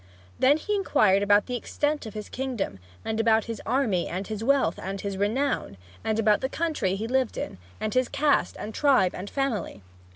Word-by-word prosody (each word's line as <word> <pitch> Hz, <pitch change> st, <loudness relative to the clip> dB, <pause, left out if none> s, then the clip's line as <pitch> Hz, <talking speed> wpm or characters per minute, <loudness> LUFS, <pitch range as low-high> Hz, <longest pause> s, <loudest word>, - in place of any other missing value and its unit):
Then 275 Hz, +3 st, +5 dB
he 420 Hz, +6 st, -3 dB
inquired 215 Hz, -, +3 dB
about 205 Hz, 0 st, +4 dB
the 250 Hz, -, -3 dB
extent 290 Hz, +2 st, -2 dB
of 215 Hz, -, -9 dB
his 210 Hz, -1 st, -5 dB
kingdom, 250 Hz, -, -3 dB, 0.3 s
and 220 Hz, 0 st, -2 dB
about 225 Hz, -1 st, +4 dB
his 230 Hz, -1 st, -5 dB
army, 225 Hz, -8 st, +1 dB
and 185 Hz, +3 st, -4 dB
his 215 Hz, +1 st, -5 dB
wealth, 265 Hz, -9 st, +2 dB
and 195 Hz, +1 st, -4 dB
his 200 Hz, 0 st, -4 dB
renown, 210 Hz, -, -1 dB, 0.3 s
and 220 Hz, -1 st, 0 dB
about 215 Hz, -1 st, +3 dB
the 265 Hz, -, -1 dB
country 310 Hz, -, -1 dB
he 215 Hz, +3 st, -3 dB
lived 260 Hz, -1 st, 0 dB
in, 95 Hz, -, -5 dB, 0.2 s
and 215 Hz, 0 st, -2 dB
his 255 Hz, -1 st, +2 dB
caste 295 Hz, -1 st, +2 dB
and 215 Hz, -, -6 dB
tribe 265 Hz, -11 st, +3 dB
and 195 Hz, +3 st, -6 dB
family. 250 Hz, -, -2 dB
225 Hz, 195 wpm, -26 LUFS, 200-270 Hz, 0.3 s, Then